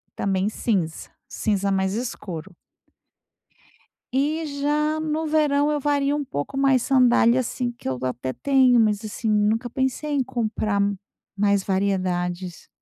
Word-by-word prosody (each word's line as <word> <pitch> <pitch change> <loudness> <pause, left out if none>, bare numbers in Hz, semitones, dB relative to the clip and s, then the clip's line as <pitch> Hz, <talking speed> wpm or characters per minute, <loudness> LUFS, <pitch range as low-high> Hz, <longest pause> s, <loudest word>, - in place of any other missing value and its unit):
também 195 0 0
cinza. 190 -8 -2 0.2
Cinza 200 -2 -1
mais 190 0 0
escuro. 195 -6 -5 1.6
E 300 +5 0
já 300 +2 +1
no 310 0 -2
verão 300 -1 +2
eu 295 - 0
vario 285 0 +1
um 290 - -3
pouco 145 - -4
mais. 270 -2 +3
Sandália, 250 -2 +4
assim, 250 0 -2
que 240 - -10
eu 130 -1 -1
até 130 0 -3
tenho, 260 - +4
mas 215 -1 +2
assim, 215 +1 -3
nunca 215 +3 +1
pensei 265 +4 -2
em 285 -2 +2
comprar 220 -5 -1 0.6
mais 200 -1 +2
variedades. 185 -2 -2
235 Hz, 130 wpm, -23 LUFS, 195-275 Hz, 1.6 s, Sandália